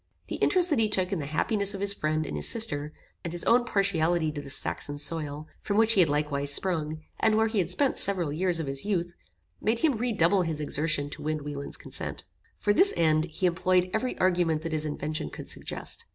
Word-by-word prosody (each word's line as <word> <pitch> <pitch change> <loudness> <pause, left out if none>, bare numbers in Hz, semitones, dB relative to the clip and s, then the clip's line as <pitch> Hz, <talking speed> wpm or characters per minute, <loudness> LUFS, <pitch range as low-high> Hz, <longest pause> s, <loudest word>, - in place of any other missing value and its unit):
The - - -4
interest 360 -2 +2
that 290 - +2
he 220 -1 +1
took 185 -2 +1
in 195 - -2
the 140 - -5
happiness 200 +6 +1
of - - -7
his 200 0 +2
friend 155 -3 -2
and - - -6
his - - +2
sister, 150 -11 +2 0.3
and 170 - -5
his 175 0 +3
own 240 +1 +3
partiality 175 -6 0
to 150 -1 -6
the 140 - -11
Saxon 145 +1 -2
soil, 150 -1 0
from 205 - -2
which 225 0 +4
he 205 - +1
had 170 -4 +4
likewise 145 -1 -1
sprung, 155 -2 +1 0.2
and 220 -1 +2
where 220 - +3
he 220 -2 -1
had 180 - -1
spent 280 -2 +5
several 180 -7 +4
years 175 +1 0
of 160 - -3
his 135 0 -2
youth, 175 -4 -2 0.5
made 220 +2 0
him 285 -1 +1
redouble 200 -6 +1
his 165 -3 -3
exertions 150 -1 0
to - - -7
win 155 -1 -3
Wieland's 145 -1 -6
consent. - - -6 0.3
For 205 - +1
this 390 - +5
end 155 -1 +2
he 170 +2 -4
employed 180 +1 +1
every 250 +4 -2
argument 175 -4 +1
that 165 -1 -4
his 155 0 -1
invention 150 - -4
could - - -10
suggest. - - -4
170 Hz, 220 wpm, -27 LUFS, 155-200 Hz, 0.5 s, spent